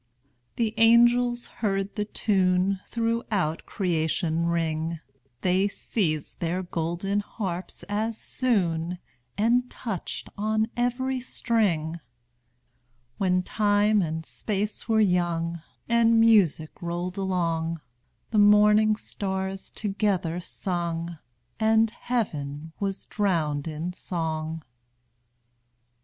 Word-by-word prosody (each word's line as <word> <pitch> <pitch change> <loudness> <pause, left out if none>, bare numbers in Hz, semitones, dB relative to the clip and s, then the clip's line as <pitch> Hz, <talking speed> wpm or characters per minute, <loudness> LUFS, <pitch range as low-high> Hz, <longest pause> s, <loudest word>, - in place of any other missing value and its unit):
The 225 -2 0
angels 240 +1 +5
heard 195 -2 -1
the 210 - -2
tune 190 -2 +1
Throughout 225 -8 -1
creation 170 -2 0
ring; 165 -1 -1 0.4
They 185 +2 +3
seized 165 -7 -2
their 175 +2 -1
golden 175 +4 -1
harps 190 -4 -5
as 215 +2 -1
soon, 180 -11 0 0.4
And 245 +4 +2
touched 210 -8 -5
on 215 +1 +1
every 250 +2 0
string. 195 -10 0 1.2
When 185 -1 +2
time 205 +1 +3
and 160 -1 -3
space 210 +5 -3
were 220 -1 +4
young, 170 -4 +1 0.3
And 230 -1 +4
music 200 -9 +3
rolled 175 +2 -3
along, 165 -3 -1 0.5
The 215 - +3
morning 210 +1 +6
stars 190 -2 -4
together 195 -5 -1
sung, 170 -2 -3 0.4
And 220 0 +4
heaven 160 - -3
was 195 -1 -3
drowned 165 -8 0
in 160 +3 -4
song. 160 -3 -3
190 Hz, 95 wpm, -26 LUFS, 170-215 Hz, 1.2 s, morning